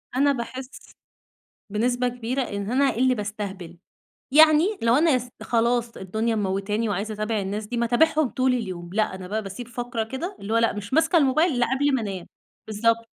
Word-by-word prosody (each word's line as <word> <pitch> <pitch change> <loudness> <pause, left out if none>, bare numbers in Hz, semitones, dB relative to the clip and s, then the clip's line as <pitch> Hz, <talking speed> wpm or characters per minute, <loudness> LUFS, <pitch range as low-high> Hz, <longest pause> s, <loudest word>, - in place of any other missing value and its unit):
أنا 280 +2 +4
باحس 255 +1 -6 1.0
بنسبة 245 +4 +1
كبيرة 245 +2 -2
إن 200 -2 -4
أنا 275 +2 +3
اللي 255 +1 +3
بأستهبل، 200 -5 -6 0.5
يعني 315 +7 +6
لو 230 +1 +4
أنا 310 -3 +4
أس 250 0 -4
خلاص 235 0 0
الدنيا 220 +5 -2
مموتاني 205 +2 -1
وعايزة 205 +2 -2
أتابع 215 +1 -2
الناس 205 +2 -4
دي 240 - -5
ما 235 - +1
اتابعهم 310 +4 +3
طول 255 0 +1
اليوم، 185 -7 -5
لأ، 215 -2 0
أنا 185 -1 -8
بقى 215 +2 -2
باسيب 200 +5 -8
فقرة 240 -1 -3
كده 330 - -5
اللي 205 +3 -5
هو - - +3
لأ، 230 - +2
مش 205 +2 -7
ماسكة 320 +3 +3
الموبايل 305 +4 +3
إلَّا 245 -1 +1
قبل 285 0 +1
ما 260 - +1
أنام، 190 -4 -5 0.4
بالضبط 230 +2 +1
230 Hz, 180 wpm, -24 LUFS, 210-260 Hz, 1.0 s, يعني